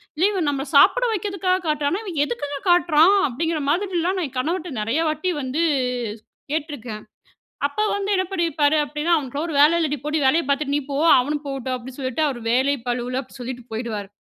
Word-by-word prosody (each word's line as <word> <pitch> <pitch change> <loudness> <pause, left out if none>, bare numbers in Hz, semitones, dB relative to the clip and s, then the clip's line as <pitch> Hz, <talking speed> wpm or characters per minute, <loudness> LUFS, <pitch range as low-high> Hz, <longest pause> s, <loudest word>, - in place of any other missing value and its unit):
இல்ல 330 +5 +2
இவன் 360 -6 -1
நம்மல 275 0 -3
சாப்பிட - - +6
வைக்கிறதுக்காக 385 -2 0
காட்டுறானா? 300 +5 0
இவன் 335 -7 -2
எதுக்குங்க 285 +2 -4
காட்டுறான்?" 350 +2 +5
அப்படிங்கிற 320 +5 -2
மாதிரிலாம் 365 +1 0
நான் 340 - -1
என் 255 - -10
கணவர்ட்ட 330 +5 -2
நெறைய 230 +9 0
வாட்டி 310 +4 -2
வந்து 260 +6 -2 0.9
கேட்ருக்கேன். 285 -9 -4 0.6
அப்ப 285 +8 -4
வந்து 405 0 -2
என்ன 375 -1 +1
பண்ணிருப்பாரு 315 -5 +1
அப்டின்னா 300 +3 0
"அவனுக்கெல்லாம் 285 +1 -3
ஒரு 315 - -4
வேல 315 +4 +6
இல்லடி 300 -3 0
போடி, 300 +1 0
வேலய 315 +6 +3
பாத்துட்டு 280 0 0
நீ - - +1
போ, 275 - -2 0.2
அவனும் 290 +3 -2
போகட்டும்" 265 -2 -3
அப்படின்னு 255 +2 -10
சொல்லிட்டு 260 +2 -2
அவரு 255 -4 -4
வேலை 265 +4 +3
பளுவுல 245 +1 -1
அப்டி 260 - -14
சொல்லிட்டு 245 0 -6
போயிடுவாரு. 220 -3 -4
295 Hz, 175 wpm, -22 LUFS, 260-335 Hz, 0.9 s, சாப்பிட